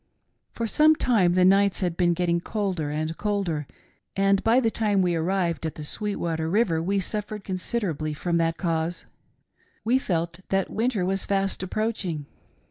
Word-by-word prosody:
"For 230 - -2
some 305 +7 +5
time 210 - +3
the 180 0 +4
nights 195 +1 +4
had 175 -3 0
been 175 -1 +2
getting 170 -1 +1
colder 185 -7 -2
and 155 +2 -2
colder, 195 -9 -1 0.5
and 195 0 +2
by 230 +3 +4
the 230 -3 +1
time 205 -4 +1
we 175 -1 +1
arrived 170 0 0
at 160 - -3
the 155 - -7
Sweetwater 165 -3 -2
river 180 -4 +2
we 195 +4 0
suffered 210 +1 -3
considerably 180 -6 -2
from 170 +2 -1
that 165 0 +1
cause; 165 -1 -2 0.8
we 250 +4 +3
felt 170 -6 -2
that 195 -1 0
winter 220 -4 0
was 195 +1 0
fast 195 -1 0
approaching. 190 -6 -2
185 Hz, 160 wpm, -25 LUFS, 165-205 Hz, 0.8 s, some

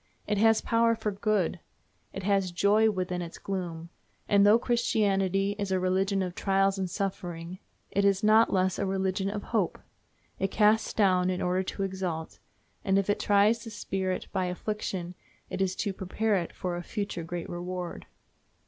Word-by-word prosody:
It 210 - 0
has 225 0 +4
power 230 0 +2
for 220 -1 -2
good; 200 -3 0 0.5
it 195 - -6
has 195 -2 +1
joy 205 +5 +4
within 180 -3 -2
its 170 -1 -7
gloom, 170 -4 -5 0.4
and, 200 -1 +5
though 210 +2 +7
Christianity 200 -5 +1
is 200 -1 -2
a 190 - +2
religion 190 +1 +1
of 180 -1 -4
trials 195 +1 +1
and 185 -1 -2
suffering, 175 -2 -4 0.3
it 200 - +1
is 200 0 +2
not 215 +2 +5
less 185 -1 +1
a 200 - 0
religion 190 0 -1
of 205 0 -4
hope; 210 -7 -1 0.6
it 195 - 0
casts 215 +2 +3
down 185 -3 +3
in 180 -1 -1
order 180 +1 +1
to 195 +1 -4
exalt, 185 -4 -4 0.4
and 195 0 +2
if 195 +1 +2
it - - -1
tries 205 +3 +3
the 225 - -7
spirit 190 -3 -3
by 190 -2 0
affliction 180 -1 -4 0.4
it - - -3
is 190 -1 0
to 205 -2 -2
prepare 205 +3 -1
it 175 -3 -2
for 180 -1 -4
a 175 - -4
future 200 -2 -4
great 170 +1 -5
reward. 175 0 -5
195 Hz, 175 wpm, -28 LUFS, 180-205 Hz, 0.6 s, though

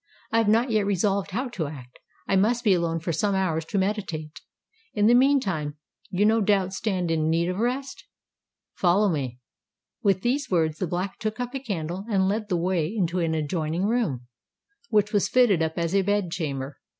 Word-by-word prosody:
"I 230 - +3
have 225 - +2
not 230 +4 +3
yet 215 -2 +2
resolved 200 0 +1
how 245 +7 -2
to 175 -10 -3
act: 130 -4 -11 0.3
I 195 - +2
must 230 +5 +2
be 210 -4 +5
alone 170 -2 0
for 165 +1 -3
some 205 +2 0
hours 165 -4 0
to 200 - -3
meditate! 190 -6 -2 0.5
In 210 -1 +2
the 230 - +6
meantime 205 - +2 0.3
you 190 +3 +1
no 220 +1 +4
doubt 195 -2 +2
stand 185 -4 -1
in 160 -1 +1
need 170 +2 +1
of 185 +2 -3
rest? 255 +4 -2 0.7
Follow 195 +3 +3
me." 135 -7 -2 0.6
With 195 -2 +2
these 260 +3 0
words 160 -4 +1
the 185 - -1
Black 180 +3 -3
took 215 0 -3
up 245 +1 -3
a 270 - -2
candle 190 -6 -4
and 190 -3 +2
led 210 +2 -1
the 180 - +1
way 170 -2 0
into 180 -3 -1
an 165 -2 0
adjoining 160 +3 -1
room, 205 - 0 0.6
which 210 -1 +2
was 205 - +2
fitted 240 -9 +4
up 160 0 -1
as 170 0 -1
a 195 - +4
bed 205 -2 0
chamber. 140 -5 -4
190 Hz, 195 wpm, -25 LUFS, 165-215 Hz, 0.7 s, the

